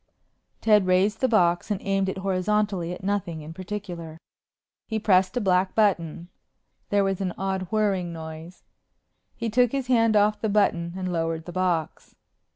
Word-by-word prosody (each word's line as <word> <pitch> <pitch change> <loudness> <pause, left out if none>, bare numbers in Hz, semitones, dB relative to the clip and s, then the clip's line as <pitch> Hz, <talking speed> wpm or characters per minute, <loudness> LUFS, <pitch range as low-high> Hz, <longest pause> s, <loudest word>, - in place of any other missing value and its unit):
Ted 210 -4 +4
raised 190 +4 +2
the 260 - +4
box 175 -7 +2
and 205 -3 -1
aimed 195 -1 0
it 190 - -4
horizontally 190 -1 0
at 180 - -7
nothing 185 -5 -2
in 155 +2 -9
particular. 175 -4 -7 0.7
He 220 - -2
pressed 190 -2 +2
a - - +3
black 185 -1 +1
button. 175 -5 +1 0.6
There 200 -1 +3
was 195 -1 -1
an 185 -2 -2
odd 190 -1 -2
whirring 200 -5 0
noise. 160 +1 -9 0.7
He 230 - -3
took 245 +1 +3
his 270 -2 -1
hand 230 -3 +3
off 210 0 +3
the 220 - 0
button 170 -5 +1
and 185 -1 -3
lowered 165 -1 -2
the 175 - -7
box. 175 -3 -2
190 Hz, 160 wpm, -25 LUFS, 175-210 Hz, 0.7 s, Ted